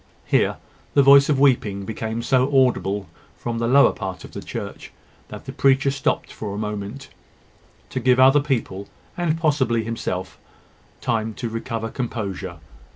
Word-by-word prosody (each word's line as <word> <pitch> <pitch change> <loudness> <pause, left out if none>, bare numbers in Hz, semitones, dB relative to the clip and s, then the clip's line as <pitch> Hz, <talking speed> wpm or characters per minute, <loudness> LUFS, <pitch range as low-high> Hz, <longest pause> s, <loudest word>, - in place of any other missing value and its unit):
Here - - +2 0.4
the 140 - +6
voice 140 +1 +7
of 140 -3 +2
weeping 110 -8 +2
became 110 +1 -4
so 130 +1 +2 0.2
audible 100 -5 -2 0.3
from 115 -1 -4
the 115 - 0
lower 140 +3 +6
part 95 -2 -6
of - - -11
the - - -7
church, - - -7 0.4
that - - -10
the - - -6
preacher 135 0 +3
stopped 135 -1 -2
for 100 -2 -5
a - - -5
moment, 105 +5 -5 0.8
to - - -2
give 125 0 +3
other 135 +3 +7
people, 115 -9 -3 0.3
and 170 -2 0
possibly 130 -8 +1
himself, 95 -5 -4 0.6
time 110 -2 -1
to 120 - -4
recover 115 0 -4
composure. 100 -8 -4
115 Hz, 155 wpm, -22 LUFS, 105-135 Hz, 0.8 s, voice